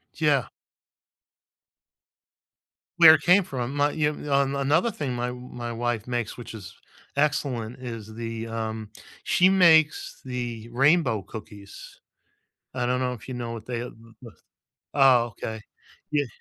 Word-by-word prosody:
Yeah. 145 Hz, -6 st, +2 dB, 2.5 s
Where 160 Hz, -2 st, +10 dB
it -, -, +2 dB
came 180 Hz, +3 st, +5 dB
from. 130 Hz, -6 st, -4 dB
My 145 Hz, 0 st, +2 dB
you 150 Hz, -1 st, +1 dB, 0.2 s
on 140 Hz, 0 st, +2 dB
another 150 Hz, +10 st, +2 dB
thing 140 Hz, -8 st, -4 dB
my 120 Hz, 0 st, -2 dB
w 125 Hz, 0 st, -7 dB
my 120 Hz, -1 st, -5 dB
wife 120 Hz, -1 st, -2 dB
makes, 120 Hz, -3 st, -3 dB
which 115 Hz, -2 st, -9 dB
is 100 Hz, -5 st, -10 dB, 0.4 s
excellent, 135 Hz, -5 st, -1 dB
is 115 Hz, -4 st, -7 dB
the, 115 Hz, 0 st, -5 dB
um 110 Hz, -1 st, -4 dB, 0.3 s
she 185 Hz, +1 st, +4 dB
makes 165 Hz, -5 st, +4 dB
the 120 Hz, -3 st, -5 dB
rainbow 135 Hz, -, +3 dB
cookies. 100 Hz, -1 st, -11 dB, 0.8 s
I 125 Hz, -1 st, -1 dB
don't 125 Hz, +1 st, 0 dB
know 125 Hz, -1 st, -1 dB
if 120 Hz, -1 st, -10 dB
you 130 Hz, -, -4 dB
know 120 Hz, -1 st, -4 dB
what 115 Hz, -1 st, -8 dB
they, 120 Hz, -1 st, -3 dB
uh, 125 Hz, -, -6 dB
v 115 Hz, -, -18 dB, 0.2 s
v 115 Hz, -, -10 dB, 0.6 s
Oh, 130 Hz, -4 st, +5 dB
okay. 110 Hz, -1 st, -5 dB, 0.5 s
Ye 145 Hz, -3 st, +1 dB
125 Hz, 145 wpm, -25 LUFS, 115-145 Hz, 2.5 s, Where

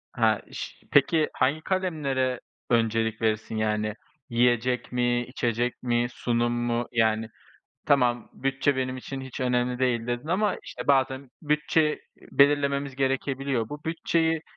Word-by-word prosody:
He, -, -, +3 dB
iş -, -, -7 dB
Peki 160 Hz, -2 st, +4 dB
hangi 140 Hz, +4 st, +1 dB
kalemlere 145 Hz, -10 st, -1 dB, 0.3 s
öncelik 115 Hz, -1 st, +1 dB
verirsin? 110 Hz, 0 st, 0 dB
Yani, 105 Hz, -1 st, 0 dB, 0.4 s
yiyecek 120 Hz, +1 st, +1 dB
mi, 120 Hz, 0 st, +1 dB
içecek 120 Hz, -1 st, -2 dB
mi, 120 Hz, -1 st, +1 dB
sunum 120 Hz, 0 st, 0 dB
mu? 120 Hz, 0 st, -1 dB
Yani, 110 Hz, -1 st, +2 dB, 0.6 s
tamam, 120 Hz, -4 st, +2 dB
"Bütçe 135 Hz, +1 st, 0 dB
benim 130 Hz, 0 st, -1 dB
için 135 Hz, +1 st, -6 dB
hiç 130 Hz, -1 st, -8 dB
önemli 125 Hz, 0 st, +1 dB
değil." 120 Hz, -3 st, +1 dB
dedin 120 Hz, +5 st, -3 dB
ama, 200 Hz, +3 st, +1 dB
işte, -, -, -8 dB
bazen 135 Hz, -1 st, +2 dB
bütçe, 150 Hz, +1 st, +2 dB
iii, -, -, -8 dB, 0.3 s
belirlememiz 140 Hz, -1 st, +3 dB
gerekebiliyor. 135 Hz, -3 st, -1 dB
Bu 150 Hz, 0 st, -8 dB
bütçeyi 165 Hz, 0 st, 0 dB
125 Hz, 130 wpm, -26 LUFS, 120-140 Hz, 0.6 s, Peki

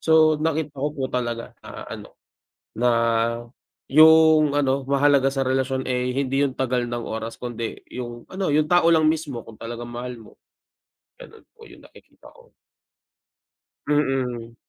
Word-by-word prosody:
So 160 Hz, -1 st, +4 dB
nakita 155 Hz, -2 st, -2 dB
ko 140 Hz, +2 st, -1 dB
po 135 Hz, -3 st, -4 dB
talaga 120 Hz, -2 st, -3 dB
na -, -, -9 dB
ano, -, -, -9 dB, 0.7 s
na 125 Hz, +2 st, +2 dB, 1.0 s
yung 155 Hz, 0 st, +6 dB
ano, 140 Hz, -1 st, 0 dB
mahalaga 140 Hz, 0 st, +3 dB
sa 135 Hz, -, -2 dB
relasyon, 130 Hz, 0 st, -1 dB
eh, 125 Hz, 0 st, -1 dB
hindi 135 Hz, +1 st, 0 dB
yung 140 Hz, -, -1 dB
tagal 125 Hz, -2 st, 0 dB
ng 120 Hz, 0 st, -4 dB
oras 110 Hz, +1 st, -6 dB
kundi 120 Hz, -2 st, -5 dB
yung 120 Hz, -1 st, -8 dB
ano, 190 Hz, -5 st, -2 dB
yung 150 Hz, +1 st, +2 dB
tao 175 Hz, 0 st, +4 dB
lang 155 Hz, -1 st, +4 dB
mismo 155 Hz, -6 st, -2 dB
kung 110 Hz, -, -13 dB
talagang 120 Hz, +1 st, -7 dB
mahal 120 Hz, +1 st, -6 dB
mo. 110 Hz, -, -15 dB, 0.9 s
Ganun 450 Hz, -3 st, -14 dB
po 455 Hz, -2 st, -16 dB
yung -, -, -16 dB
nakikita -, -, -18 dB
ko. -, -, -21 dB, 1.4 s
Mm. 130 Hz, -5 st, -1 dB
135 Hz, 145 wpm, -23 LUFS, 120-155 Hz, 1.4 s, yung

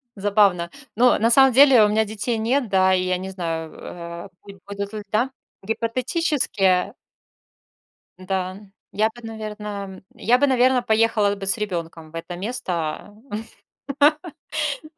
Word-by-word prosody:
забавно. 200 Hz, -4 st, +2 dB, 0.3 s
Но 245 Hz, +2 st, +4 dB
на 225 Hz, +2 st, +3 dB
самом 265 Hz, +1 st, +6 dB
деле, 265 Hz, -3 st, +7 dB
у -, -, +5 dB
меня 220 Hz, +1 st, +2 dB
детей 220 Hz, +2 st, -3 dB
нет, 240 Hz, +2 st, 0 dB
да 190 Hz, 0 st, +4 dB
и 185 Hz, 0 st, +2 dB
я 185 Hz, 0 st, 0 dB
не 190 Hz, +1 st, -6 dB
знаю, 165 Hz, -4 st, -4 dB
э, 170 Hz, -1 st, -9 dB, 0.4 s
будут 200 Hz, +1 st, -5 dB
ли, 210 Hz, -1 st, -5 dB
да 240 Hz, +5 st, +1 dB, 0.3 s
Гипотетически 230 Hz, -, 0 dB, 1.3 s
да, 185 Hz, 0 st, -3 dB, 0.3 s
я 215 Hz, +2 st, +1 dB
бы, 240 Hz, -, -13 dB
наверно 210 Hz, -3 st, -7 dB
я 245 Hz, +3 st, +2 dB
бы, 285 Hz, -, +3 dB
наверно, 255 Hz, -1 st, +3 dB
поехала 220 Hz, -3 st, +2 dB
бы 195 Hz, -1 st, -7 dB
с 195 Hz, -, +1 dB
ребенком 170 Hz, -6 st, -5 dB
в 165 Hz, -, -11 dB
это 165 Hz, +2 st, -6 dB
место. 185 Hz, -4 st, -4 dB, 1.8 s
А, -, -, -59 dB
205 Hz, 135 wpm, -22 LUFS, 185-230 Hz, 1.8 s, деле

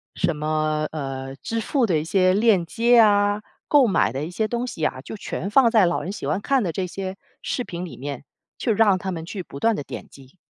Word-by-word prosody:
什 175 Hz, -3 st, 0 dB
么， 155 Hz, 0 st, 0 dB
呃， 135 Hz, -3 st, -5 dB
支 225 Hz, -, -3 dB
付 260 Hz, +3 st, +1 dB
的 180 Hz, -7 st, +1 dB
一 -, -, -3 dB
些 185 Hz, +2 st, +3 dB
链 205 Hz, -4 st, +3 dB
接 235 Hz, +6 st, +4 dB
啊， 205 Hz, -1 st, +4 dB, 0.3 s
购 280 Hz, -5 st, +6 dB
买 190 Hz, -, +2 dB
的 135 Hz, +4 st, -3 dB
一 -, -, -6 dB
些 215 Hz, +4 st, -1 dB
东 240 Hz, +1 st, -2 dB
西 160 Hz, -10 st, -3 dB
啊， 130 Hz, -, -1 dB
就 145 Hz, -, -8 dB
全 195 Hz, 0 st, -4 dB
放 235 Hz, +1 st, +5 dB
在 220 Hz, -5 st, +5 dB
老 175 Hz, -, 0 dB
人 190 Hz, -, -4 dB
喜 210 Hz, -, -6 dB
欢 195 Hz, -, 0 dB
看 270 Hz, +3 st, +2 dB
的 175 Hz, -, -1 dB
这 190 Hz, -, -2 dB
些 190 Hz, +1 st, -5 dB, 0.3 s
视 250 Hz, -, -2 dB
频 175 Hz, -5 st, -6 dB
里 175 Hz, -, -10 dB
面， 140 Hz, 0 st, -6 dB, 0.3 s
去 240 Hz, -, 0 dB
让 205 Hz, -2 st, +4 dB
他 190 Hz, +1 st, -4 dB
们 165 Hz, -2 st, -5 dB
去 190 Hz, +3 st, -5 dB
不 140 Hz, -, -10 dB
断 230 Hz, +5 st, +2 dB
地 145 Hz, -, -4 dB
点 -, -, -8 dB
击。 135 Hz, +4 st, -17 dB
185 Hz, 255 characters per minute, -23 LUFS, 155-225 Hz, 0.3 s, 购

